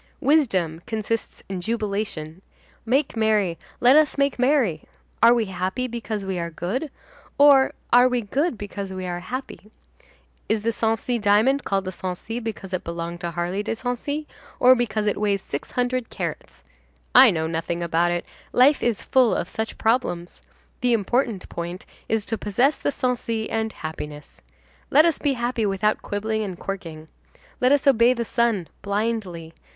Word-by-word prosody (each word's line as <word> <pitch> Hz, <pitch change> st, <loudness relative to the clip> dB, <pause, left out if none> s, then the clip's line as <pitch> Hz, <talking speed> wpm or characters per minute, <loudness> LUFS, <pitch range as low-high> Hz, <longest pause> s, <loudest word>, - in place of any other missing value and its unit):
Wisdom 220 Hz, -, +2 dB
consists 220 Hz, 0 st, -3 dB
in 190 Hz, -2 st, -4 dB
jubilation. 200 Hz, -6 st, -3 dB, 0.5 s
Make 270 Hz, +3 st, +1 dB
merry, 215 Hz, -6 st, +1 dB, 0.2 s
let 250 Hz, +3 st, +6 dB
us 305 Hz, -1 st, +4 dB
make 280 Hz, -2 st, +1 dB
merry. 250 Hz, -, +2 dB, 0.4 s
Are 235 Hz, +1 st, +7 dB
we 230 Hz, -2 st, +1 dB
happy 190 Hz, +5 st, -2 dB
because 225 Hz, -3 st, -4 dB
we 190 Hz, -2 st, -3 dB
are 170 Hz, 0 st, -3 dB
good, 190 Hz, -, -3 dB, 0.5 s
or 280 Hz, -2 st, +6 dB, 0.2 s
are 245 Hz, +1 st, +7 dB
we 250 Hz, -1 st, 0 dB
good 265 Hz, -, -1 dB
because 200 Hz, -1 st, -6 dB
we 185 Hz, -1 st, -5 dB
are 175 Hz, -1 st, -3 dB
happy? 250 Hz, 0 st, -7 dB, 0.8 s
Is 220 Hz, -1 st, +1 dB
the 230 Hz, -, +1 dB
Sancy 225 Hz, +2 st, 0 dB
diamond 220 Hz, +7 st, +3 dB
called 195 Hz, -1 st, 0 dB
the 185 Hz, -, -3 dB
Sancy 190 Hz, +6 st, -5 dB
because 215 Hz, -5 st, -6 dB
it 185 Hz, -, -2 dB
belonged 170 Hz, +1 st, -5 dB
to 170 Hz, -, -2 dB
Harley 175 Hz, +3 st, -2 dB
de 220 Hz, +2 st, -3 dB
Sancy, 260 Hz, +6 st, -3 dB, 0.3 s
or 255 Hz, +1 st, +8 dB
because 225 Hz, -4 st, -1 dB
it 210 Hz, 0 st, 0 dB
weighs 200 Hz, -2 st, +1 dB
six 140 Hz, -, -5 dB
hundred 250 Hz, -1 st, -1 dB
carats? -, -, -6 dB, 0.5 s
I 255 Hz, 0 st, +9 dB
know 160 Hz, -5 st, 0 dB
nothing 165 Hz, +1 st, -2 dB
about 170 Hz, +1 st, +2 dB
it, 175 Hz, 0 st, -2 dB, 0.3 s
life 275 Hz, +4 st, +5 dB
is 235 Hz, -4 st, 0 dB
full 255 Hz, -4 st, +3 dB
of -, -, -2 dB
such 220 Hz, 0 st, -4 dB
problems; 220 Hz, -7 st, -1 dB, 0.4 s
the 245 Hz, -1 st, +2 dB
important 230 Hz, -1 st, 0 dB
point 175 Hz, +2 st, -6 dB, 0.2 s
is 220 Hz, -2 st, 0 dB
to 225 Hz, -1 st, -3 dB
possess 245 Hz, +8 st, +2 dB
the -, -, -1 dB
Sancy 235 Hz, -4 st, -2 dB
and 220 Hz, 0 st, -1 dB
happiness. 150 Hz, -3 st, -8 dB, 0.5 s
Let 305 Hz, +3 st, +6 dB
us 335 Hz, -3 st, +2 dB
be 285 Hz, -2 st, +1 dB
happy 240 Hz, -3 st, -1 dB
without 200 Hz, +2 st, 0 dB
quibbling 220 Hz, +2 st, -2 dB
and 190 Hz, -4 st, -4 dB
quirking. 165 Hz, -6 st, -6 dB, 0.5 s
Let 255 Hz, +1 st, +3 dB
us 285 Hz, -1 st, +3 dB
obey 250 Hz, -2 st, +5 dB
the 235 Hz, -1 st, -2 dB
sun 225 Hz, -7 st, 0 dB
blindly. 200 Hz, -6 st, -3 dB
220 Hz, 165 wpm, -23 LUFS, 185-245 Hz, 0.8 s, I